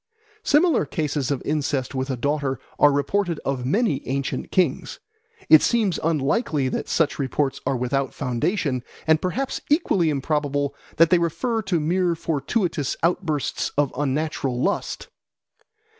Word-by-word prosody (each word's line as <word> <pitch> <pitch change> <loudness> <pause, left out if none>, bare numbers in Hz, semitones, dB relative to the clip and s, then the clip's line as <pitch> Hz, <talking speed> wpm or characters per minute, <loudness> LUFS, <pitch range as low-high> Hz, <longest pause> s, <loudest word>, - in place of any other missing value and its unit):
Similar 310 - +3
cases 145 -3 -2
of 140 -3 -2
incest 145 -3 -1
with 130 0 -2
a 130 - -2
daughter 140 0 -1 0.2
are 145 - +6
reported 165 +5 0
of 130 -2 -2
many 205 - +1
ancient 135 +1 -2
kings. 185 -2 0 0.5
It 155 - +8
seems 215 -7 +1
unlikely 150 - +1
that - - -4
such 160 -3 +1
reports 135 0 -1
are 135 - +1
without 130 +2 -1
foundation, 130 - -1 0.2
and 160 0 +3
perhaps 250 +9 -2
equally 240 - +2
improbable 145 -1 -1 0.2
that 165 +2 +5
they 180 - +5
refer 225 +8 -1
to 190 -5 0
mere 175 +2 +1
fortuitous 160 - -1
outbursts 165 -4 0
of 145 -2 +1
unnatural 140 -2 -1
lust. 200 +10 -2
150 Hz, 135 wpm, -23 LUFS, 135-180 Hz, 0.5 s, It